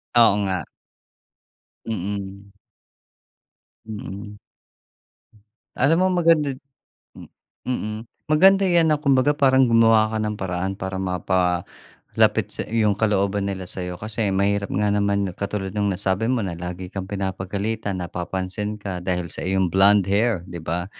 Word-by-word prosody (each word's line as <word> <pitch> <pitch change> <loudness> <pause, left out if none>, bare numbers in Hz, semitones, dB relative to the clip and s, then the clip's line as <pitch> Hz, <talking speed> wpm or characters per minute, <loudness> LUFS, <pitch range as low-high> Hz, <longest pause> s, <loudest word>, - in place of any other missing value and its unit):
Oo 115 -4 +6
nga. 90 -5 -2 1.2
Mm. 100 -1 -5 1.3
Mm. 105 -1 -8 1.4
Alam 145 +6 +3
mo 185 - +4
maganda 155 -4 +3 0.6
hmm. - - -12 0.4
Mm. 110 -4 -2 0.3
Maganda 190 +6 +5
'yan 170 -3 +3
na 150 - +3
kumbaga 140 0 +3
parang 130 -2 +4
gumawa 115 -1 +5
ka 110 - -2
ng 110 -1 -1
paraan 95 0 -2
para, 95 -1 -5
mapalapit 90 -1 -1 0.7
sa - - -4
'yung 110 -2 +2
kalooban 100 -1 0
nila 95 -1 -5
sa 90 - -6
'yo, 90 0 -5
kasi 110 +2 -2
mahirap 100 +1 0
nga 105 +1 +1
naman 100 -2 0
katulad 100 0 -4
nung 105 -1 0
nasabi 95 +4 -1
mo, 125 -5 0
na 90 - -4
lagi 90 +2 -6
kang 95 -1 -5
pinapagalitan, 100 +2 -3
napapansin 95 +4 -4
ka, 95 -4 -5
dahil 90 -2 -3
sa - - -7
iyong 95 -2 0
blonde 100 0 +5
hair, 100 -1 +1
'di 85 -2 -8
ba? 85 +2 -2
100 Hz, 135 wpm, -23 LUFS, 95-110 Hz, 1.4 s, Oo